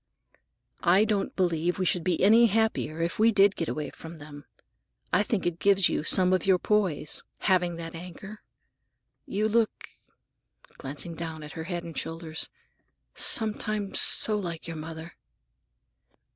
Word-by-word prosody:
"I 185 +4 +4
don't 205 -2 -1
believe 175 -1 0
we 185 - -1
should 175 -2 +1
be 180 -2 0
any 225 +4 +7
happier 215 -7 0
if 170 - -3
we 225 +1 +5
did 200 -1 +4
get 165 - -3
away 150 -2 -4
from 165 +1 -10
them. 145 -1 -11 0.7
I 190 - +5
think 210 -2 -1
it 175 -1 -1
gives 195 -2 +4
you - - -1
some 185 +3 +4
of 185 - +1
your 190 -1 +5
poise, 180 -7 0 0.2
having 180 -3 +2
that 165 0 -7
anchor. 180 +5 -9 0.9
You 210 +2 0
look," 225 0 0 0.9
glancing 145 +5 -6
down 160 -1 -6
at 150 - -9
her 160 - -6
head 175 -1 -4
and 165 -1 -9
shoulders, 160 -1 -4 0.6
"sometimes 215 -2 0
so 215 - +2
like 175 -5 -4
your 165 - -6
mother." 160 +2 -8
175 Hz, 150 wpm, -27 LUFS, 165-205 Hz, 0.9 s, any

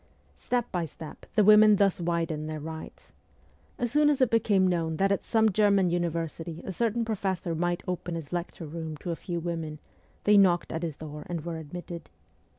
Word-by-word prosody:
Step 245 -1 -2
by 180 -3 -1
step 160 0 -9
the 210 - +5
women 215 +1 +8
thus 200 -2 +2
widened 165 -2 -1
their 155 0 -4
rights. 160 +1 -9 0.7
As 240 -2 -2
soon 295 +1 +4
as 290 - +2
it 255 -3 +3
became 205 -4 +3
known 165 -3 0
that 195 +2 +2
at 200 - 0
some 220 -1 +3
German 200 -3 +3
university 170 -1 -2
a - - -3
certain 230 +3 0
professor 190 -5 -2
might 175 +1 -1
open 180 -1 -3
his 165 -1 -7
lecture 175 -1 -4
room 160 0 -6
to 175 - -5
a - - -1
few 170 +1 -4
women, 165 -2 -4 0.5
they 205 0 +6
knocked 175 -3 +3
at 160 - -3
his 165 -4 -3
door 150 -1 -8
and 170 -2 -4
were 170 -1 -3
admitted. 170 +2 -8
175 Hz, 190 wpm, -28 LUFS, 165-200 Hz, 0.7 s, women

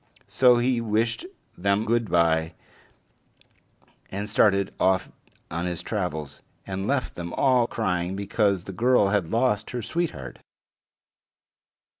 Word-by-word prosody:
So 125 -2 +5
he 120 0 +1
wished 115 - -1 0.3
them 100 +3 +1
good 115 -1 0
by, 80 -1 +2 1.5
and 100 +2 -4
started 100 -2 +2
off 95 0 +2 0.4
on 85 +2 -2
his 90 -1 -4
travels, 80 -8 -4 0.2
and 95 +1 -4
left 135 -1 -1
them 85 -1 -6
all 125 -3 +3
crying 90 -5 -2
because 100 -2 0
the 95 - -7
girl 115 0 +3
had 100 -5 0
lost 115 -3 +1
her 120 -2 -4
sweetheart. 155 - -3
100 Hz, 120 wpm, -25 LUFS, 90-120 Hz, 1.5 s, So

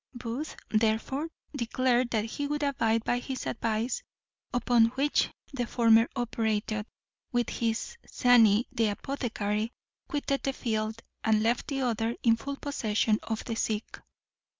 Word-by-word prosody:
Booth 245 +5 -4 0.2
therefore 225 +7 +1 0.3
declared 245 0 +1
that 220 -2 0
he 285 +5 -3
would 295 0 -1
abide 230 -5 +1
by 245 - +1
his 260 +1 -5
advice, 225 +1 -1 0.5
upon 245 -2 +4
which 285 +2 +2 0.2
the 245 -3 -2
former 230 -1 +5
operator, 220 -3 -1 0.5
with 240 -2 0
his 235 - -2
zany, 235 -2 +5
the 230 -4 +2
apothecary, 215 -1 -2 0.4
quitted 280 -1 -1
the 270 - -1
field, 220 -2 -2 0.2
and 215 -1 +3
left 235 +2 +1
the 275 -2 -2
other 230 -2 0
in 230 -2 +5
full 280 +5 -5
possession 220 -6 0
of 225 -1 -4
the 230 - -2
sick. 215 -1 -2
230 Hz, 135 wpm, -29 LUFS, 220-255 Hz, 0.5 s, former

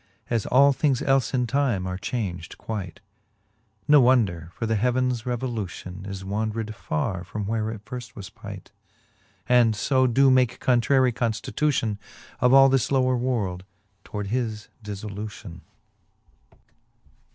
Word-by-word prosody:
As 115 -3 0
all 140 +2 +5
things 135 -3 +1
elle 135 0 +4
in 125 -2 +1
time 120 -7 0
are 90 0 -3
chaunged 95 -7 -4
quight. 100 -3 -6 0.9
Ne 150 - +7
wonder; 105 -11 +2
for 115 - -3
the 110 0 0
heavens 125 +1 0
revolution 105 -7 -4
Is 95 -1 -6
wandred 110 +2 -2
farre 90 0 -3
from, 105 +1 -5
where 110 +1 -1
it 110 -1 -8
firft 125 -1 -8
was 100 -2 -8
pight, - - -10 0.8
And 120 -3 +4
fo 130 +3 +2
doe 135 +3 +4
make 125 -1 +2
contrarie 130 +1 +3
conftitution 115 0 -1 0.4
of 125 0 +4
all 135 0 +8
this 135 -1 +1
lower 130 -1 +3
world^ 115 -8 -1 0.4
toward 105 -2 -5
his 110 -4 -2
difTolution. 105 -3 -7
115 Hz, 130 wpm, -25 LUFS, 105-130 Hz, 0.9 s, all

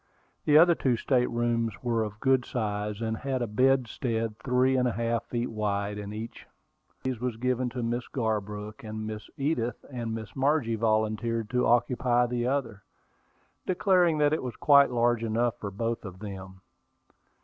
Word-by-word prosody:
The 150 0 +6
other 170 +2 +7
two 130 -7 +1
state 125 0 +1
rooms 115 -1 0
were 115 -2 +1
of 105 -1 -6
good 130 0 +3
size, 105 -3 -3
and 110 0 -1
had 130 -1 -2
a - - 0
bedstead 115 -1 0
three 130 +2 +2
and 125 -1 +2
a - - +1
half 115 0 -1
feet 120 0 -3
wide 105 -1 -2
in 100 0 -6
each. 110 +2 -7 0.4
One - - -39
of - - -40
these 130 -3 -2
was 125 -3 -2
given 125 +1 0
to 120 0 -4
Miss 120 +1 -2
Garbrook, 105 -3 -3
and 110 0 -5
Miss 110 0 -6
Edith 125 -5 -1
and 115 -3 -3
Miss 110 -3 -8
Margie 135 -3 +1
volunteered 110 0 0
to 125 0 +2
occupy 120 +1 +3
the 120 0 -1
other, 125 -7 -2 0.9
declaring 180 -3 +3
that 150 0 +3
it 155 - 0
was 125 -2 -5
quite 140 -1 +6
large 120 -1 +1
enough 115 +1 0
for 100 - -4
both 115 +4 -3
of 95 -3 -8
them. 95 -2 -8
115 Hz, 175 wpm, -28 LUFS, 110-125 Hz, 0.9 s, other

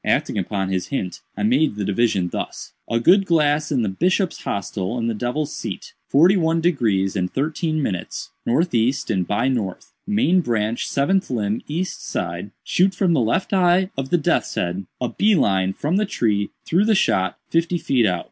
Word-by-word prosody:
Acting - - +1
upon 95 0 -2
this 95 -1 -2
hint, 95 -10 -4 0.2
I - - -2
made 210 - +2
the 105 -1 -3
division 100 -3 +1
thus: - - -6 0.2
'A 115 0 +1
good 190 - +5
glass 150 -2 +2
in 130 -5 +1
the - - 0
Bishop's 180 - 0
hostel 100 +2 -3
in 115 - -2
the 115 - 0
Devil's 125 +7 -2
seat—forty 145 - +1
one 165 -1 +1
degrees 110 - +1
and 90 -2 -1
thirteen 155 +2 -1
minutes—northeast 120 - -1
and 90 -2 0
by 110 +5 +1
north—main 170 - 0
branch 115 -5 -1
seventh 190 +8 +1
limb 110 -3 -1
east 175 +5 -3
side—shoot 100 - -1
from 180 -2 +2
the 155 - +3
left 115 - 0
eye 185 0 +3
of 135 0 -4
the 175 - +3
death's 155 - 0
head—a 95 +7 -3
bee 210 +1 +2
line 95 - +2
from 150 - -1
the 210 0 +1
tree 105 - 0 0.2
through 180 +5 +2
the 220 -1 +3
shot 95 - +1
fifty 170 +1 +1
feet 125 -8 +2
out. 90 -2 0
130 Hz, 170 wpm, -21 LUFS, -, 0.2 s, good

